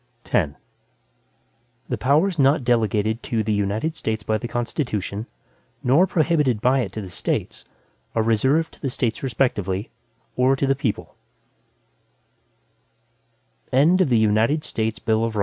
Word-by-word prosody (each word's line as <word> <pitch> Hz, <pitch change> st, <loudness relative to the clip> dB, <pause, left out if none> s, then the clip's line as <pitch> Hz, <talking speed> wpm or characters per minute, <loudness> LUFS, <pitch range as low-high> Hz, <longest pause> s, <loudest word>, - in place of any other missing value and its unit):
X 75 Hz, -7 st, +2 dB, 1.3 s
The 125 Hz, -, -2 dB
powers 155 Hz, -, +2 dB
not 135 Hz, 0 st, +4 dB
delegated 110 Hz, -2 st, +1 dB
to 115 Hz, -2 st, -1 dB
the 110 Hz, 0 st, 0 dB
United 105 Hz, +10 st, -1 dB
States 110 Hz, -6 st, -3 dB
by 110 Hz, 0 st, 0 dB
the 120 Hz, -, -5 dB
Constitution, 115 Hz, -, -3 dB, 0.6 s
nor 145 Hz, +10 st, +4 dB
prohibited 150 Hz, -, +1 dB
by 125 Hz, +4 st, +3 dB
it 110 Hz, -8 st, -2 dB
to 110 Hz, -, -4 dB
the 95 Hz, -, -8 dB
States, -, -, -3 dB, 0.5 s
are 110 Hz, -, +2 dB
reserved 130 Hz, +9 st, +2 dB
to -, -, -19 dB
the 135 Hz, -, -1 dB
States 120 Hz, -3 st, -2 dB
respectively, 105 Hz, -7 st, -1 dB, 0.4 s
or 130 Hz, +2 st, +3 dB
to 135 Hz, -, 0 dB
the 135 Hz, -, +3 dB
people. 135 Hz, -6 st, -3 dB
120 Hz, 115 wpm, -23 LUFS, 110-135 Hz, 1.3 s, not